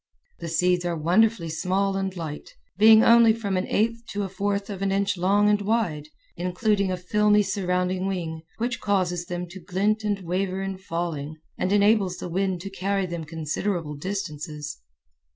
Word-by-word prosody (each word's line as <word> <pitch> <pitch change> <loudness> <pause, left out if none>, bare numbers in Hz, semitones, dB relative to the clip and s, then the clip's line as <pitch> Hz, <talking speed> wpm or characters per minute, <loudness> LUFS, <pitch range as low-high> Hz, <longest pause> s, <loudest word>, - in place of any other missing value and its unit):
The 170 - -5
seeds 180 +2 +2
are 175 -1 -1
wonderfully 180 +3 +2
small 190 +5 0
end 190 -1 -2
light, 155 -3 -7 0.2
being 220 +3 +7
only 230 -1 +7
from 205 -4 -3
an 185 - -1
eighth 230 +2 0
to 205 0 -3
a 195 - -4
fourth 200 +1 -2
of 195 -1 -6
an 195 0 0
inch 200 +1 +1
long 200 +3 +3
and 210 0 +3
wide, 200 -9 -1 0.3
including 190 +3 0
a 185 - -1
filmy 210 +3 +3
surrounding 185 -1 -1
wing, 165 -4 -3 0.2
which 235 0 -2
causes 180 -4 0
them 175 0 -3
to 190 +2 -9
glint 205 +5 0
and 205 -2 -1
waver 185 +2 -2
in 195 -1 -4
falling 165 -4 -4 0.2
and 185 - -1
enables 205 -3 +3
the - - -6
wind 185 0 -1
to 195 +1 -7
carry 195 0 -1
them 170 -2 -5
considerable 160 +1 -3
distances. 150 -3 -5
190 Hz, 170 wpm, -25 LUFS, 175-205 Hz, 0.3 s, being